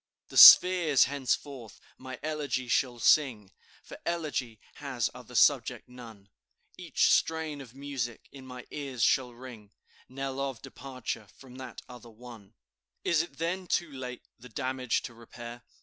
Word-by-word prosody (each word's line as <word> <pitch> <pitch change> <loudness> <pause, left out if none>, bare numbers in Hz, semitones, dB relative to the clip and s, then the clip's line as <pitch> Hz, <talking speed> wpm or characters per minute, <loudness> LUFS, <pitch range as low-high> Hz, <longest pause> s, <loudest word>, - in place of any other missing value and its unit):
"The - - -7
spheres 175 -6 +9
henceforth 135 -4 -3 0.2
my 130 0 -10
elegy 150 -5 -3
shall 120 0 0
sing, 115 -6 +2 0.3
For - - -12
elegy 145 -9 -3 0.2
has 130 -5 -3
other - - -13
subject - - +2
none; 115 -5 -13 0.5
Each - - +1
strain 160 -3 0
of 125 -2 -14
music 135 -4 -5
in 135 -2 -13
my 125 -1 -10
ears 135 -6 -4
shall 125 +2 +2
ring 120 -4 -13 0.4
Knell 135 +1 -5
of 135 -3 -3
departure 130 -5 -7
from 130 -2 -14
that 130 -3 -9
other 125 -1 -13
one. 115 -2 -14 0.5
"Is't 165 -4 0
then 175 +3 -3
too 175 -3 -1
late 130 -2 -8 0.2
the 125 +2 -13
damage 130 +1 -2
to 120 - -8
repair? 120 +1 -11
130 Hz, 140 wpm, -29 LUFS, 120-140 Hz, 0.5 s, spheres